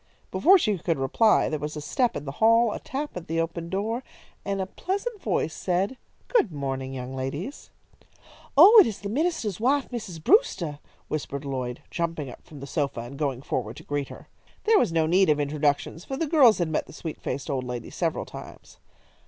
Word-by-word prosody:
Before 320 Hz, -, +6 dB
she 215 Hz, -, 0 dB
could 165 Hz, 0 st, 0 dB
reply 135 Hz, -, +3 dB
there 155 Hz, -, -2 dB
was 150 Hz, +1 st, -4 dB
a -, -, -3 dB
step 240 Hz, -, 0 dB
in 145 Hz, -, -7 dB
the 135 Hz, -, -4 dB
hall, 230 Hz, +1 st, +5 dB
a -, -, -4 dB
tap 290 Hz, +2 st, -5 dB
at 180 Hz, -2 st, -7 dB
the 165 Hz, +1 st, -1 dB
open 165 Hz, 0 st, -3 dB
door, 220 Hz, +7 st, -2 dB, 0.4 s
and 200 Hz, 0 st, -2 dB
a 190 Hz, -, 0 dB
pleasant 400 Hz, -, -4 dB
voice 175 Hz, -6 st, -1 dB
said: 190 Hz, +7 st, -1 dB, 0.3 s
"Good 360 Hz, -, +2 dB
morning, 135 Hz, -2 st, -4 dB
young 130 Hz, +1 st, -6 dB
ladies." 145 Hz, -, -5 dB, 0.9 s
"Oh, 405 Hz, +9 st, +10 dB
it 405 Hz, -, +7 dB
is 215 Hz, -, -5 dB
the 200 Hz, -, -4 dB
minister's 240 Hz, -, -1 dB
wife, 270 Hz, +4 st, +1 dB
Mrs. 195 Hz, -10 st, -6 dB
Brewster," 175 Hz, -, +3 dB, 0.3 s
whispered 140 Hz, -2 st, -4 dB
Lloyd, 130 Hz, -3 st, -4 dB
jumping 165 Hz, -5 st, -3 dB
up -, -, -14 dB
from 145 Hz, -3 st, -12 dB
the -, -, -6 dB
sofa 140 Hz, -4 st, -2 dB
and 120 Hz, +4 st, -8 dB
going 135 Hz, -3 st, -2 dB
forward 120 Hz, -2 st, -3 dB
to -, -, -10 dB
greet 145 Hz, -1 st, -2 dB
her. -, -, -11 dB, 0.4 s
There 435 Hz, -1 st, +5 dB
was -, -, +1 dB
no 165 Hz, -1 st, +2 dB
need 185 Hz, +3 st, +4 dB
of 150 Hz, -1 st, +3 dB
introductions, 145 Hz, +2 st, 0 dB
for 270 Hz, -, -5 dB
the 325 Hz, -, 0 dB
girls 285 Hz, -8 st, +6 dB
had 175 Hz, -3 st, 0 dB
met 155 Hz, -, -1 dB
the -, -, -12 dB
sweet 160 Hz, 0 st, -7 dB
faced 140 Hz, -, -4 dB
old 135 Hz, -4 st, -1 dB
lady 125 Hz, -1 st, -5 dB
several -, -, -1 dB
times. -, -, -12 dB
170 Hz, 200 wpm, -26 LUFS, 140-230 Hz, 0.9 s, Oh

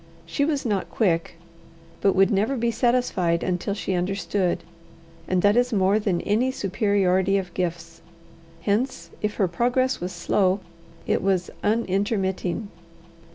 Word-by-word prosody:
She 165 Hz, +13 st, 0 dB
was 290 Hz, -3 st, -1 dB
not 205 Hz, -5 st, -1 dB
quick, 170 Hz, -7 st, 0 dB, 0.7 s
but 195 Hz, -, +3 dB
would 195 Hz, 0 st, +4 dB
never 215 Hz, +7 st, +1 dB
be 235 Hz, 0 st, +1 dB
satisfied 230 Hz, -8 st, +1 dB
until 185 Hz, +2 st, -1 dB
she 195 Hz, -, -3 dB
understood, 185 Hz, 0 st, -1 dB, 0.6 s
and 185 Hz, -1 st, +1 dB
that 205 Hz, +1 st, +5 dB
is 245 Hz, +1 st, +2 dB
more 200 Hz, 0 st, +3 dB
than 195 Hz, -5 st, 0 dB
any 225 Hz, +5 st, +1 dB
superiority 195 Hz, -4 st, +1 dB
of 185 Hz, -3 st, -4 dB
gifts. 170 Hz, -2 st, -4 dB, 0.6 s
Hence, 220 Hz, +9 st, -1 dB
if 210 Hz, 0 st, -1 dB
her 195 Hz, -, +2 dB
progress 250 Hz, +8 st, +1 dB
was 180 Hz, +1 st, -3 dB
slow, 190 Hz, 0 st, +1 dB, 0.5 s
it -, -, +1 dB
was 190 Hz, -2 st, 0 dB
unintermitting. 200 Hz, -2 st, 0 dB
195 Hz, 135 wpm, -24 LUFS, 185-225 Hz, 0.7 s, that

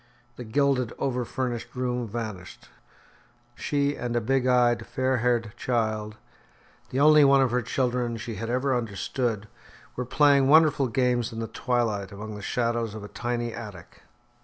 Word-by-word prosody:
The 125 Hz, -, -7 dB
gilded, 130 Hz, 0 st, +1 dB
over 125 Hz, -2 st, -1 dB
furnished 120 Hz, -1 st, -4 dB
room 125 Hz, -1 st, -2 dB
vanished. 105 Hz, -5 st, -7 dB, 0.8 s
She 145 Hz, 0 st, -1 dB
and 120 Hz, -1 st, -4 dB
a -, -, +3 dB
big 130 Hz, +3 st, 0 dB
eyed, 120 Hz, -2 st, +3 dB
fair 130 Hz, 0 st, 0 dB
haired 115 Hz, -2 st, 0 dB
child, 110 Hz, -3 st, -2 dB, 0.7 s
the 130 Hz, -, -2 dB
only 150 Hz, +1 st, +7 dB
one 140 Hz, 0 st, +6 dB
of 130 Hz, -, 0 dB
her 125 Hz, +1 st, +1 dB
children 120 Hz, -1 st, -1 dB
she 115 Hz, +1 st, -6 dB
had 115 Hz, +2 st, -5 dB
ever 130 Hz, +2 st, +1 dB
understood, 115 Hz, -1 st, -2 dB, 0.5 s
were 125 Hz, -, -3 dB
playing 140 Hz, +1 st, +4 dB
wonderful 150 Hz, -2 st, +5 dB
games 125 Hz, -1 st, 0 dB
in 115 Hz, -, -8 dB
the 115 Hz, -, -2 dB
twilight 110 Hz, -7 st, -1 dB
among 105 Hz, +2 st, -7 dB
the 105 Hz, -, -8 dB
shadows 115 Hz, 0 st, -1 dB
of 110 Hz, -, -7 dB
a 105 Hz, -, -8 dB
tiny 120 Hz, +2 st, -3 dB
attic. 105 Hz, -7 st, -10 dB
120 Hz, 160 wpm, -26 LUFS, 110-130 Hz, 0.8 s, only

